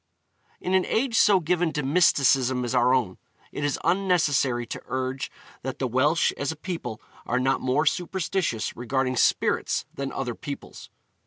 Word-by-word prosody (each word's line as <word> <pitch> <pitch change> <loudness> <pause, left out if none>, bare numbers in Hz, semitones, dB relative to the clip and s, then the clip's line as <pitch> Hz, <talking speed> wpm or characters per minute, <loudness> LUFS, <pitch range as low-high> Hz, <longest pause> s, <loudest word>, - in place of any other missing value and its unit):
In 185 - -2
an 190 -1 +4
age 230 +1 0
so 205 -3 +5
given 175 0 0
to 150 - -2
mysticism 135 -4 +3
as 120 - -3
our 125 0 +4
own, 120 -8 0 0.3
it 145 - -5
is 145 -2 0
unnecessary 150 -10 +2
to - - -7
urge 130 +1 -3 0.3
that 130 -1 -5
the 135 - -2
Welsh 145 +7 +2
as 140 +1 -1
a - - -6
people 150 - -5 0.3
are 125 - +1
not 130 +1 +1
more 135 +5 +1
superstitious 175 - -1
regarding 130 +2 -1
spirits - - +1
than 140 0 -4
other 125 -3 -3
peoples. 140 +4 -8
135 Hz, 160 wpm, -25 LUFS, 130-170 Hz, 0.3 s, so